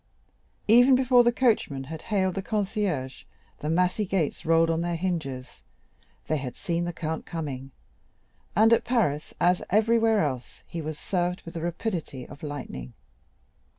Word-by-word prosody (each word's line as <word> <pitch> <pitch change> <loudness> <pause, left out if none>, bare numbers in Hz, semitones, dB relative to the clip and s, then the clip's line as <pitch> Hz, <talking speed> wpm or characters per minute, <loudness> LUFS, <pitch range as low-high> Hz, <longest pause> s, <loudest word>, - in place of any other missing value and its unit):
Even 245 +4 +7
before 255 -1 +5
the 240 - +4
coachman 220 - +1
had 155 +3 -7
hailed 190 -3 0
the 195 - -2
concierge, 195 - -2 0.4
the 150 - -3
massy 180 +5 +2
gates 180 -6 -1
rolled 165 0 +4
on 165 0 0
their 170 0 -1
hinges—they 155 -2 -5
had 130 -3 -5
seen 170 0 -2
the 175 - -2
Count 160 -1 -4
coming, 140 -5 -5 0.9
and 220 +2 +6
at 230 - +3
Paris, 195 - 0
as 180 +1 +3
everywhere 225 +1 +3
else, 130 -4 -5
he 170 - -5
was 155 0 -5
served 180 0 -1
with 165 - -9
the 165 - -4
rapidity 170 - -3
of 145 - -12
lightning. 130 - -6
170 Hz, 150 wpm, -27 LUFS, 150-210 Hz, 0.9 s, Even